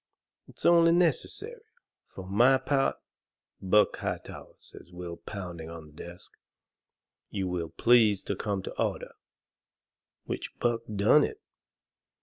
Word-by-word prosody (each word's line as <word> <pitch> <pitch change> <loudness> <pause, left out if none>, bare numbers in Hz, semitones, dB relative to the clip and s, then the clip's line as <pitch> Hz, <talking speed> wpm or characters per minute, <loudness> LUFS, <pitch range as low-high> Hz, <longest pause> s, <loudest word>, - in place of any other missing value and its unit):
It's - - -7
only 170 -1 +6
necessary. 180 - 0 0.5
For 95 - -10
my 120 +8 +4
part 135 0 +1 0.4
" - - -48
"Buck 105 0 +4
Hightower," - - -6
says 90 - -15
Will, 90 -1 -7
pounding 90 -5 -7
on 85 -1 -9
the 75 - -16
desk, 85 +3 -10 1.0
"you 95 -2 -3
will 90 -2 -3
please 110 -3 +4 0.2
come 100 -3 -2
to - - -7
order." - - -2 1.1
Which - - -5
Buck 120 -1 0
done 105 +9 +5
it. 420 - -3
100 Hz, 125 wpm, -28 LUFS, 90-135 Hz, 1.1 s, only